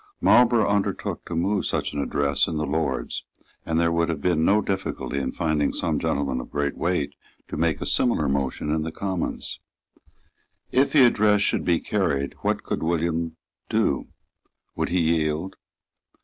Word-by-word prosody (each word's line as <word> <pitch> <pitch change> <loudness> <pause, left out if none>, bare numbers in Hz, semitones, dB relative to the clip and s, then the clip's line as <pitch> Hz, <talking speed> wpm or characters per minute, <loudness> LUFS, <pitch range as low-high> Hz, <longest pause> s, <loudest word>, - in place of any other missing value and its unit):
Marlborough 120 -2 +5
undertook 100 -1 -1
to 85 - -5
move 95 +4 +1
such - - -1
an 75 - -1
address 70 0 +1
in 80 - -3
the 75 - -1
Lords; 80 +1 -2 0.4
and 80 0 +1
there 85 0 +2
would 85 0 +1
have 80 -3 -2
been 85 -1 +1
no 100 +5 +4
difficulty 95 -8 -2
in 70 - -2
finding 80 -3 0
some - - -1
gentleman 70 -3 -1
of - - -11
great 70 -1 -1
weight 80 -5 -1 0.4
to - - -4
make 80 -1 +1
a - - -4
similar 115 - +2
motion 70 +2 -1
in 80 0 +1
the 80 +1 -3
Commons. 95 0 -3 1.1
If 135 +2 +3
the 140 -4 +7
address 105 -3 +4
should - - +1
be 85 -2 +3
carried, 70 -9 -1
what - - 0
could - - -3
William 85 0 -1 0.3
do? - - +1 0.7
Would - - -1
he 90 0 +2
yield? 80 +2 0
85 Hz, 165 wpm, -24 LUFS, 75-95 Hz, 1.1 s, the